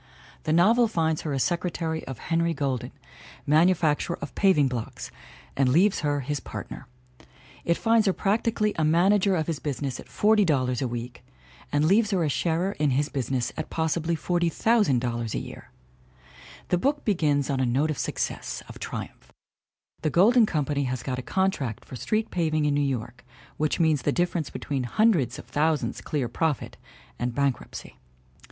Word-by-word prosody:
The 155 - 0
novel 220 +9 +5
finds 160 -6 0
her 155 - -4
a 140 - -1
secretary 165 +1 -1
of 130 -2 -6
Henry 165 +3 0
Golden, 135 -4 -2 0.5
manufacturer 160 +1 +2
of - - -7
paving 185 -8 +4
blocks, 120 -3 -5 0.4
and 135 -2 +2
leaves 185 +9 +3
her 145 -1 0
his 145 +2 -3
partner. 130 - -8 0.8
It 170 - +2
finds 225 -2 +3
her - - +5
practically 210 +1 0
a - - +2
manager 185 +5 +3
of 160 -2 0
his 160 -4 -3
busi 145 0 -4
ness 135 -3 -3
at - - -10
$40 155 - +2
a 130 - 0
week 120 0 -6 0.5
and 145 +1 +2
leaves 205 +5 +4
her 185 -4 +1
a 155 - +1
sharer 170 +6 0
in 150 -1 +2
his 140 +3 +1
business 130 -3 -2
at 155 - -5
possibly 165 +1 0
$40,000 155 - +1
a - - 0
year. - - -8 1.0
The 180 - +2
book 285 +7 0
begins 150 - +1
on 135 - -1
a 130 - +2
note 140 +6 +1
of 150 - -5
success, - - -3
of - - -11
triumph; - - -7 0.7
the 155 - +1
Golden 215 - +5
Company 145 -4 -1
has 125 -1 -3
got' 130 -2 -3
a - - -3
contract 150 - -1
for - - -9
street 215 - -1
paving 155 -3 0
in 145 - +2
New 145 - +1
York 125 -3 -3 0.3
which 155 +3 0
means 160 -4 +3
the 145 - +1
difference 175 -1 -1
between 135 -4 -3
hundreds 180 - +2
of - - -12
thou 155 +2 +3
sands - - -5
clear 145 -5 -2
profit 155 +1 -2 0.4
and 120 -1 -2
bankruptcy. 140 -2 -3
155 Hz, 170 wpm, -26 LUFS, 135-180 Hz, 1.0 s, novel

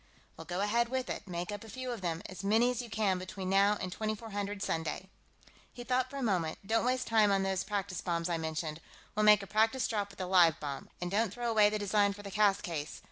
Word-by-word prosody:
"Well, 165 - -10
go 175 +4 -3
ahead 235 +3 +2
with 260 0 -2
it. 205 - -6
Make 175 +1 -4
up 205 +1 -6
a 225 - -11
few 255 +3 -5
of 235 -4 -5
them; 170 0 -2
as 190 +1 -8
many 225 +5 +3
as 250 -1 -3
you 240 - -9
can 205 -4 +1
between 185 +1 -5
now 200 +2 +4
and 185 - -4
2400 205 -1 -3
Sunday." 165 +4 -3 0.6
He 245 - -9
thought 255 +1 0
for 280 - -7
a 275 - -3
moment. 175 -8 0
"Don't 225 +3 +1
waste 255 0 +1
time 215 -2 +4
on 195 -1 +2
those 190 -1 0
practice 200 -3 -3
bombs 170 -1 -1
I 170 -2 -1
mentioned. 160 0 -3 0.3
We'll 215 0 +1
make 210 -1 +7
a - - -6
practice 225 +5 +2
drop 205 -3 -2
with 195 - -15
a 185 - -2
live 175 -4 +5
bomb. 140 -2 -5
And 175 0 -3
don't 215 0 +1
throw 240 +2 -2
away 210 -2 +5
the 215 - -1
design 205 0 +2
for 205 +1 -11
the 200 - -7
cast 205 -1 +3
case. 155 -4 -4
200 Hz, 245 wpm, -32 LUFS, 180-220 Hz, 0.6 s, make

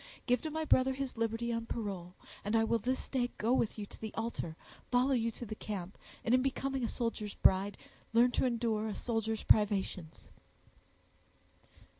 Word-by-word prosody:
Give 250 -2 +3
to 315 - -3
my 315 +1 -2
brother 265 -2 +4
his 270 -1 -3
liberty 230 +1 -1
on 230 0 -3
parole, 190 -6 -4 0.3
and 210 +2 0
I 225 - +5
will 230 +1 +2
this 255 +4 -1
day 245 -2 0
go 230 +4 +2
with 230 -4 +1
you 210 - -4
to - - -15
the 220 -1 -4
altar, 225 -8 -3 0.3
follow 250 +2 +3
you 230 -3 +2
to 235 +2 -7
the 215 - -5
camp, 200 -3 -5 0.3
and, 230 - +3
in 255 - +6
becoming 270 0 -1
a - - +2
soldier's 230 -4 -3
bride, 195 +2 +3 0.3
learn 235 +2 +5
to - - +1
endure 230 -3 0
a 215 - -3
soldier's 225 -2 -1
privations." 195 -6 +2
230 Hz, 180 wpm, -33 LUFS, 210-250 Hz, 0.3 s, in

